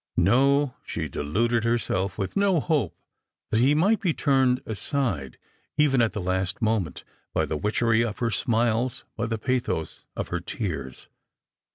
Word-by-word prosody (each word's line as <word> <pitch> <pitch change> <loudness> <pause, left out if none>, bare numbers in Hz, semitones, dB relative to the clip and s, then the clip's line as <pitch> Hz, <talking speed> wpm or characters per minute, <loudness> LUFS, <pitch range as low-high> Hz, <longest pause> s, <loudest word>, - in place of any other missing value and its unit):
No; 135 +8 +4
she - - -3
deluded 115 +10 0
herself 105 -5 0
with 95 -3 -3
no 200 -4 +3
hope 135 - 0 0.5
that 110 - +3
he 135 +5 +4
might 200 +7 +3
be 175 -6 +1
turned 130 -2 +3
aside 105 - -2 0.4
even 140 -4 +4
at 115 -2 +2
the 105 - -3
last 95 0 -1
moment, 110 - -1 0.3
by - - +2
the 80 - -3
witchery 110 +6 +2
of 110 -2 -3
her 115 -1 0
smiles, 115 +2 +1
by 115 0 -2
the 115 0 -1
pathos 120 - -2
of - - -4
her 90 - -1
tears. 80 - -5
115 Hz, 155 wpm, -26 LUFS, 95-130 Hz, 0.5 s, No